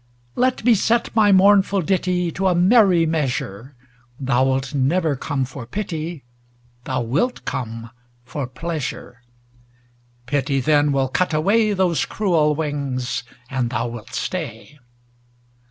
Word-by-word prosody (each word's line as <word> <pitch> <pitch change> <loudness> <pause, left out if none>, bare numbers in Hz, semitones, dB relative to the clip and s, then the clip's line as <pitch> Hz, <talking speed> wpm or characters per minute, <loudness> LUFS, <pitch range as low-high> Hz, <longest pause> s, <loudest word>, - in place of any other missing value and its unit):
Let 255 -1 +1
me 240 +1 +5
set 225 +3 +1
my 210 -2 +5
mournful 195 0 +4
ditty 180 0 0
To 190 +4 -1
a 180 - +2
merry 185 -2 +5
measure; 135 -6 -3 0.4
Thou 130 -1 +2
wilt 135 +1 -1
never 145 +3 +1
come 135 0 -2
for 125 -2 -9
pity, 165 - -5 0.6
Thou 130 -1 -1
wilt 155 - -1
come 115 -2 -5 0.3
for 140 0 -4
pleasure; 135 -3 -5 1.0
Pity 135 +1 0
then 145 +1 +3
will 135 -1 +1
cut 165 +4 0
away 210 +7 +2
Those 180 -6 +1
cruel 165 -8 +1
wings, 140 -5 -2 0.3
and 130 -2 -2
thou 120 +1 -2
wilt 115 -2 -9
stay. 145 - -5
150 Hz, 125 wpm, -21 LUFS, 130-185 Hz, 1.0 s, me